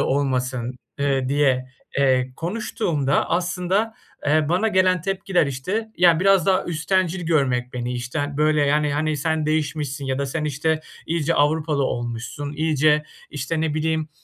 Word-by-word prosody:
olmasın?" 130 -2 -1 0.2
eee, 135 -2 +1
diye, 135 -2 +2 0.3
eee, 130 -2 +2
konuştuğumda 165 -6 -1
aslında, 180 +5 0 0.3
eee, 150 +1 +3
bana 185 +6 +2
gelen 185 -3 +3
tepkiler, 190 -3 +1
işte, 185 - -3
ya, 170 -2 +5
biraz 195 -2 +4
daha 190 -1 +3
üsttencil 180 +2 0
görmek 130 -6 +1
beni, 125 0 -3
işte, 125 +4 -4
ha 145 -1 -2
böyle, 150 0 +3
yani, 150 0 +2
hani 155 +1 0
"Sen 155 +1 -1
değişmişsin." 150 -2 -1
ya 130 0 -1
da, 140 - -1
"Sen 150 +3 -3
işte, 155 +2 0 0.3
iyice 165 0 0
Avrupalı 150 -1 +2
olmuşsun 120 +4 -4
iyice." 150 0 +2 0.3
işte, 150 +2 -3
ne 160 -2 0
bileyim, 160 0 -1
150 Hz, 150 wpm, -22 LUFS, 140-170 Hz, 0.3 s, ya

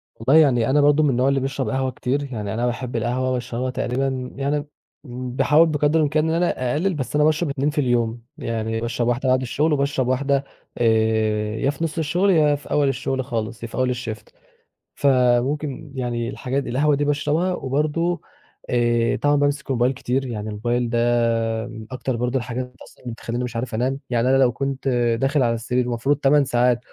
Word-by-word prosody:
والله 125 +6 +2
يعني 125 -6 +3
أنا 145 +2 +4
برضه 145 +1 +4
من 150 - +3
النوع 130 +1 +2
اللي 140 0 +2
بيشرب 135 0 -2
قهوة 130 -1 -1
كتير، 130 +3 -2
يعني 105 -3 -4
أنا 120 +2 -1
باحب 125 0 -3
القهوة 125 +3 0
وباشربها 125 0 -2
تقريبًا 130 0 -2
يعني 145 +2 -1 0.4
باحاول 130 +6 +2
بقدر 150 +1 +2
الإمكان 155 +1 +1
إن 160 - +1
أنا 165 -8 0
أقلِّل 185 +6 0
بس 145 -3 -4
أنا 150 - +4
باشرب 155 +1 +1
2 140 +1 0
في 150 0 0
اليوم، 120 -2 0 0.2
يعني 115 0 -3
باشرب 120 0 -1
واحدة 120 +2 0
بعد 130 0 +3
الشُغل 150 +5 0
وباشرب 140 -2 0
واحدة 135 +2 +1 0.3
آآ 110 -2 +1
يا 125 +5 0
في 145 +3 -3
نُص 160 -1 -3
الشُغل، 170 +5 +1
يا 155 -5 +4
في 145 - -11
أول 145 -1 +3
الشُغل 135 -1 -2
خالص، 115 -1 -4
يا - - -3
في - - -10
أول 125 -1 +1
الshift. 115 -3 -7 0.7
فممكن 135 +2 +1
يعني 120 -2 -2
الحاجات 135 +1 -3
القهوة 145 +4 +2
دي 145 +1 0
باشربها 150 +5 0
وبرضه 155 +4 -1 0.5
آآ 120 -1 +2
طبعًا 145 0 +2
بامسك 145 -1 0
الmobile 125 +1 +2
كتير، 130 +1 -2
يعني 110 -3 -4
الmobile 120 +3 -1
ده 115 -1 +1
من 110 -2 -9
أكتر 130 0 -3
برضه 125 +2 -1
الحاجات 125 0 -4
أصلًا - - -18
اللي 120 -2 -5
بتخلّيني 120 +1 -4
مش 125 -1 -5
عارف 115 0 -3
أنام. 130 +4 -1
يعني 120 0 +1
أنا 135 - +4
لو 130 -2 +4
كنت 135 +2 -3 0.3
داخل 135 +1 +2
على 115 -1 +2
السرير 125 +2 -1
المفروض 125 +4 0
8 140 0 +3
ساعات 120 -1 +2
130 Hz, 190 wpm, -22 LUFS, 120-145 Hz, 0.7 s, أنا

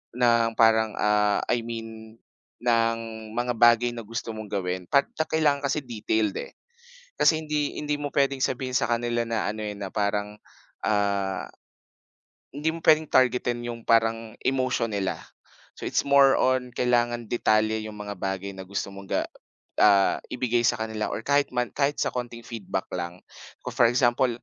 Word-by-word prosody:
ng 115 -2 +3
parang, 110 -1 +4
ah, 105 -1 +2
I 120 - +2
mean, 115 -1 -8 0.4
ng 115 -1 +2 0.4
mga 125 0 0
bagay 120 +1 +5
na 115 - -5
gusto 115 +1 -5
mong 110 0 -7
gawin, 90 -2 -3
'pagka 140 +3 +1
ang - - -36
kailangan 150 -3 +2
kasi 150 +2 -1
detailed, 110 -3 -1
eh. - - -8 0.6
Kasi 160 -1 +4
hindi 150 -1 -2
hindi 150 0 -1
mo 145 - -2
pwedeng 140 -1 +1
sabihin 130 0 -2
sa - - +1
kanila 120 0 0
na, 115 -2 -1
ano, 110 +1 -4
eh, 105 - -3
na 100 -1 -5
parang, 105 0 -1 0.5
ah, 100 -2 0 1.1
hindi 150 +3 -1
mo 165 - -7
pwedeng 155 -1 +5
targetin 125 -1 +2
‘yong 115 -1 -5
parang 115 -1 +2
emotion 130 -3 +1
nila. 100 -2 -1 0.6
So, - - -7
it's - - +1
more 140 -1 +6
on, 130 -1 +1
kailangan 120 -1 +1
detalye 110 -2 +2
‘yong 105 -1 -8
mga 105 0 -5
bagay 95 0 -3
na 95 - -7
gusto 100 +1 -4
mong 100 0 -11
ga - - +1 0.6
ah, 100 -2 +5
ibigay 120 -1 0
sa 120 -1 +2
kanila, 110 -1 -3
or - - -3
kahit 140 +3 +1
man 125 -1 0
kahit 145 +1 0
sa - - +1
konting 120 -1 -5
feedback 105 -5 -4
lang. 85 0 -5 0.5
Ah, - - -2
for - - +4
example, 120 0 +2
115 Hz, 165 wpm, -26 LUFS, 105-125 Hz, 1.1 s, more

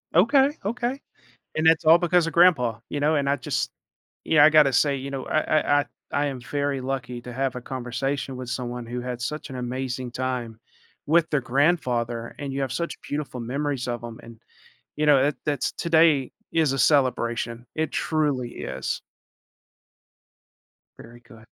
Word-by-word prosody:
Okay, 265 - +5 0.2
okay. 240 +5 -2 0.6
And 155 - 0
that's 165 +1 +5
all 160 +2 +8
because 175 -1 +2
of 165 - -4
grandpa, 135 -11 +4
you 145 - -3
know, 150 +2 +2
and 140 -2 +1
I 140 - +3
just 130 - -2 0.5
yeah, 150 -2 +5
I 155 - +8
gotta 150 -3 +5
say, 140 +2 +3
you 135 +1 -6
know, 135 -1 -4
I 155 - +2 0.2
I 145 0 +3
I - - -3 0.3
I 145 +1 +2
am 135 -3 -4
very 140 +1 -2
lucky 130 -2 -4
to 125 - -8
have 135 +1 -2
a 125 - -4
conversation 130 +2 -3
with 125 -1 -7
someone 125 -1 -4
who 120 +1 -4
had 125 0 -5
such 140 +6 -4
an 130 - -6
amazing 125 0 -4
time 125 -3 -3 0.5
with 165 +2 +3
their 150 - +2
grandfather, 120 -4 0
and 140 -1 -5
you 140 - -3
have 135 -2 -2
such 170 +3 -2
beautiful 140 -4 -4
memories 135 +2 -2
of 120 -1 -3
him, 115 -1 -8
and, 115 -1 -13 0.6
you 150 - 0
know, 145 -3 +6
that 145 +1 +1
that's 145 -2 0
today 160 -5 +3 0.2
is 155 -4 +2
a 135 - -2
celebration, 120 -4 +1
it 160 -1 -1
truly 145 -6 0
is. 65 0 -4 2.0
Very 120 +1 -13
good. 115 -2 -17
135 Hz, 175 wpm, -25 LUFS, 125-150 Hz, 2.0 s, all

